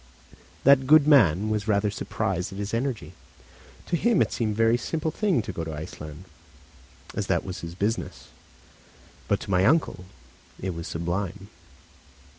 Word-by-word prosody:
That 135 -1 +5
good 150 0 +6
man 110 - +5
was 105 0 -1
rather 105 -1 +2
surprised 95 -2 -3
at 95 - -8
his 100 +1 -4
energy. 120 0 -2 0.7
To - - -1
him 235 +7 +2
it - - -6
seemed 110 -3 -1
a - - -7
very 115 +1 +4
simple 155 +6 -2
thing 185 - +1
to 105 - -5
go 85 - -4
to 80 -1 -5
Iceland, 75 +1 -8 0.9
as - - -3
that - - 0
was 95 -1 -5
his 85 0 -7
business; 105 +5 -3 1.0
but - - +1
to - - -6
my 90 0 +3
uncle 135 - +2 0.5
it 95 - -3
was 85 0 -6
sublime. 95 +4 -3
105 Hz, 160 wpm, -26 LUFS, 90-130 Hz, 1.0 s, good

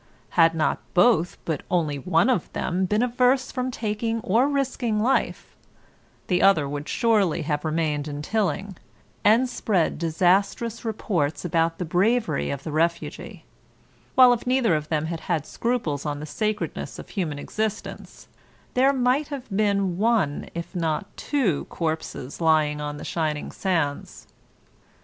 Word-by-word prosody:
Had 165 -1 +4
not 155 -3 +1 0.2
both 180 -3 +4
but 160 -4 -2
only 155 -5 0
one 165 - +2
of 245 -10 0
them 185 +1 -1
been 210 +5 +1
averse 250 +2 +2
from 255 -1 -2
taking 225 -1 -2
or 235 +4 +2
risking 255 -6 -1
life, 245 +5 0 0.7
the 180 -1 +1
other 175 -8 +4
would 145 +1 -5
surely 215 -8 +2
have 150 -1 -2
remained 155 -2 -1
in 145 0 -5
Tilling, 200 -1 -1 0.5
and 230 +5 +5
spread 190 -10 0
disastrous 190 +8 +1
reports 180 -9 -1
about 165 -1 +1
the 180 - -3
bravery 185 0 +1
of 140 -1 -4
the 160 - -5
refugee; 165 +2 -2 0.7
while 250 -1 +8
if 240 0 -4
neither 250 -6 +3
of 150 0 -3
them 155 -1 0
had 165 0 -4
had 160 -4 -2
scruples 225 - -2
on 145 -1 -3
the 150 - -6
sacredness 215 +6 -3
of - - -10
human 165 -8 -3
existence 215 +7 -5 0.5
there 265 +2 +4
might 260 +3 +1
have 265 -8 -6
been 200 -3 +1
one 210 -10 +1
if 170 +2 -6
not 165 +3 -2
two 225 - 0
corpses 160 -3 -4
lying 155 -2 +2
on 145 0 -4
the - - -8
shining 155 -3 -2
sands. 165 -7 -2
180 Hz, 145 wpm, -24 LUFS, 155-230 Hz, 0.7 s, while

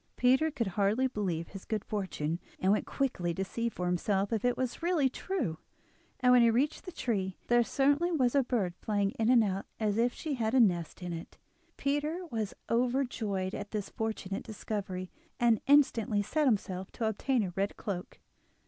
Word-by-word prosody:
Peter 260 +5 +4
could 275 -6 -2
hardly 205 +7 +2
believe 185 -9 -2
his 195 -1 -9
good 215 -3 -3
fortune, 170 -6 -2 0.2
and 190 - +3
went 210 - +1
quickly 180 -11 -1
to 190 - -1
see 230 +4 -2
for 180 -5 -4
himself 195 +4 0
if 220 - 0
it 245 0 +2
was 255 +3 -2
really 335 -5 +3
true; 260 - -3 0.6
and 250 0 +5
when 250 - +7
he 235 - +6
reached 265 +7 +1
the 365 - -6
tree 195 - -2
there 240 0 +5
certainly 285 +8 +2
was 255 -7 +2
a 280 - +5
bird 225 -8 -1
flying 205 -2 +1
in 225 +1 +2
and 245 -3 +6
out 195 -1 -2
as 215 -1 +1
if 240 +1 +3
she 310 +2 -4
had 230 -2 0
a - - +6
nest 180 -5 +2
in 175 -1 -3
it. 165 0 -8 0.4
Peter 300 +6 -1
was 220 -4 -2
overjoyed 230 -6 0
at 205 0 -5
this 210 -2 -3
fortunate 215 -3 -3
discovery, 195 -4 -5 0.3
and 235 -3 +4
instantly 240 -7 +4
set 300 +7 +1
himself 190 -5 -1
to 225 - -2
obtain 230 +3 +1
a 180 -3 -4
red 200 +2 -1
cloak. 185 -4 -5
220 Hz, 185 wpm, -31 LUFS, 195-255 Hz, 0.6 s, when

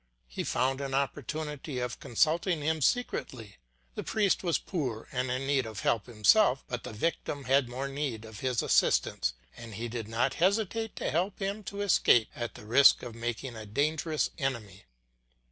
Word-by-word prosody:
He - - -4
found 135 +1 0
an 135 -1 -2
opportunity 145 +1 -3
of 125 -1 -3
consulting 160 - +1
him 160 +1 0
secretly. 130 - -1 0.4
The - - -4
priest 205 -4 +1
was 170 -3 +2
poor 130 - -4
and 130 -2 -1
in 130 +2 -2
need 135 -3 +1
of 110 -2 -6
help 115 -3 +1
himself, 125 - +4
but 125 -2 -4
the - - -6
victim 145 +4 -2
had 130 -1 +2
more 130 +3 -3
need 135 -6 -3
of 110 -2 -10
his 125 -3 0
assistance, - - +2 0.2
and 115 -3 -9
he 115 +4 -4
did 115 -2 -5
not 120 +4 0
hesitate 220 +3 +1
to - - -2
help 185 +5 0
him 200 +2 -3
to 200 0 -5
escape 125 - +4
at 120 -1 -5
the - - -11
risk 130 +6 +6
of 120 -2 -6
making 120 +2 -4
a 110 -1 -8
dangerous 155 +6 0
enemy. 115 -9 -3
135 Hz, 175 wpm, -30 LUFS, 115-155 Hz, 0.4 s, risk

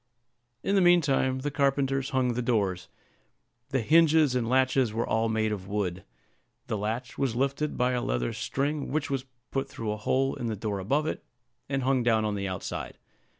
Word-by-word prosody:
In 195 - 0
the 195 - +4
mean 175 0 +6
time 130 -3 +1
the 145 +2 -2
carpenters 135 -1 +1
hung 130 -2 +1
the 125 - -1
doors. 100 -7 0 0.8
The 135 -2 0
hinges 155 +1 +5
and 120 -2 0
latches 130 -2 +3
were 115 +2 -1
all 110 0 +1
made 110 -1 +1
of 95 -3 -4
wood. 95 -3 -2 0.6
The - - -2
latch 110 +5 -3
was 130 -5 0
lifted 140 +4 -1
by 125 0 +2
a 125 -1 0
leather - - -1
string, 140 +1 -2
which 145 -1 -1
was 135 -1 -1 0.3
put 135 0 -2
through 110 -5 -4
a 105 - -3
hole 135 +5 +1
in 120 - -4
the 110 - -2
door 105 -1 -3
above 140 +11 0
it, - - -3 0.5
and 135 -2 -1
hung 130 0 +2
down 115 -2 +2
on 105 - 0
the 100 -1 -2
outside. 95 -1 -5
125 Hz, 195 wpm, -28 LUFS, 110-140 Hz, 0.8 s, mean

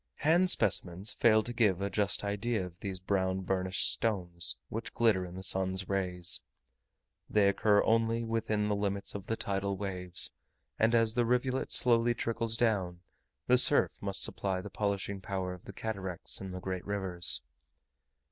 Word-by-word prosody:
Hand 175 +4 +4
specimens 95 - +3
fail 110 -2 +3
to 120 - -6
give 105 -6 +1
a 100 - -2
just 100 +1 0
idea 105 0 -2
of 85 -1 -13
these 95 -2 -5
brown 95 0 -1
burnished 95 0 +1
stones 90 -6 -1
which 115 +1 -7
glitter 105 -6 +1
in 90 - -11
the 95 - -8
sun's 95 0 -1
rays. 90 -3 0 0.9
They 105 -2 +3
occur 105 +1 +2
only 115 +1 +1
within 110 -2 -2
the 105 - 0
limits 100 -1 -2
of 100 -2 -8
the 115 - -1
tidal 100 -2 -3
waves; 90 -3 +6 0.5
and 115 +1 +2
as 115 -1 +2
the 120 0 +1
rivulet 125 +2 -1
slowly 120 -1 +2
trickles 115 0 -2
down, 95 -7 -1 0.4
the 125 0 +4
surf 145 +3 +5
must 100 -1 +1
supply 95 -2 -2
the 95 +2 -9
polishing 100 -1 -3
power 95 -1 -4
of 90 - -14
the - - -9
cataracts 95 -5 -5
in 95 - -7
the 90 0 -7
great 95 -1 -5
rivers. 95 -7 0
100 Hz, 165 wpm, -30 LUFS, 95-115 Hz, 0.9 s, waves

